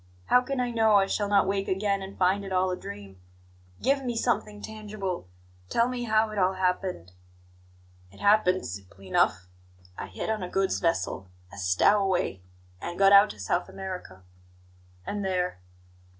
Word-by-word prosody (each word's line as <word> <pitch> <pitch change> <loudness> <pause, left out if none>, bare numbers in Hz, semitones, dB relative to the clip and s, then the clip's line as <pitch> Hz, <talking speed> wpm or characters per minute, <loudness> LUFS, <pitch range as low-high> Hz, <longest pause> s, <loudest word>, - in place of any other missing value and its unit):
How 250 - +5
can 270 +1 -3
I 245 -1 0
know 220 -2 +4
I 195 -1 +5
shall 205 +1 -1
not 200 -1 +4
wake 195 0 -1
again 195 +1 0
and 190 +1 -8
find 190 +2 +2
it 195 - -7
all 185 0 +2
a - - -1
dream? 100 - -10 0.6
Give 275 0 +2
me 245 -2 -2
something 215 -3 -1
tangible 205 - -5 0.4
tell 235 +1 +2
me 250 -1 -3
how 220 -1 +2
it 210 - -3
all 185 0 +3
happened." 180 - -2 1.0
"It 100 - -17
happened 200 -3 +3
simply 95 +1 -9
enough. 95 0 +2 0.5
I - - -5
hid 95 - -4
on 215 -2 -2
a 180 - -4
goods 195 0 0
vessel, 95 - -1 0.2
as 95 -2 -3
stowaway, 185 - +2 0.4
and 175 0 -5
got 195 0 +6
out 200 +1 +8
to - - -9
South 135 - -1
America." 180 - -7 0.8
"And 205 0 -3
there?" 180 - -1
190 Hz, 165 wpm, -27 LUFS, 175-210 Hz, 1.0 s, out